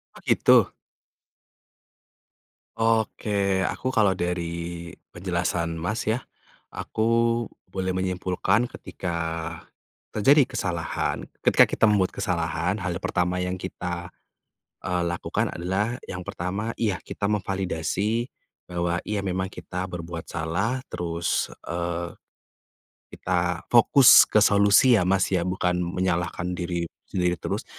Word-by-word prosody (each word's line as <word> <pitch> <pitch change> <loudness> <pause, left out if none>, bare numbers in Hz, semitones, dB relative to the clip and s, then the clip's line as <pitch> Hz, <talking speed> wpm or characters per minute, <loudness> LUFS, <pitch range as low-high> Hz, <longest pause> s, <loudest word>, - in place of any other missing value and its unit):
Oh - - -13
gitu? - - +4 2.1
Oke, 105 -4 +1
aku 130 - -3
kalau 110 -6 +3
dari 85 -1 -3 0.2
penjelasan, 85 -2 -1
Mas, 105 +7 -2
ya, 120 - 0 0.5
aku 110 - -4 0.7
boleh 95 -1 -1
menyimpulkan 95 +4 0
ketika 90 -1 -6 1.0
terjadi 135 +5 +5
kesalahan 85 -9 -2 0.2
ketika - - +6
kita - - -6
membuat 95 -3 +2
kesalahan, 85 +2 -1
hal 90 -3 -2
pertama 90 +1 0
yang 90 +1 -2
kita, 90 -1 -5 0.7
eee, 90 -1 -1
lakukan 85 0 -2
adalah 95 +7 -2
yang 90 -2 -5
pertama, 100 +6 -3
iya 105 -6 +1
kita 100 +1 -4
memvalidasi, 100 +2 -1 0.4
bahwa 85 -1 -1
iya 105 -1 -2
memang 95 0 -2
kita 90 +1 -5
berbuat 85 -2 -6
salah, 90 +10 -2
terus, 85 0 -2 0.2
eee, 85 0 -3 1.0
kita 90 -1 -1
fokus 120 +2 +8
ke 105 - +4
solusi 100 +4 +5
ya, 90 - +1
Mas, 95 0 +2
ya, 90 -2 +1
bukan 90 -1 0
menyalahkan 90 0 -1
diri 85 -1 -2 0.2
sendiri 90 -2 0
terus, - - -3
90 Hz, 110 wpm, -25 LUFS, 85-100 Hz, 2.1 s, fokus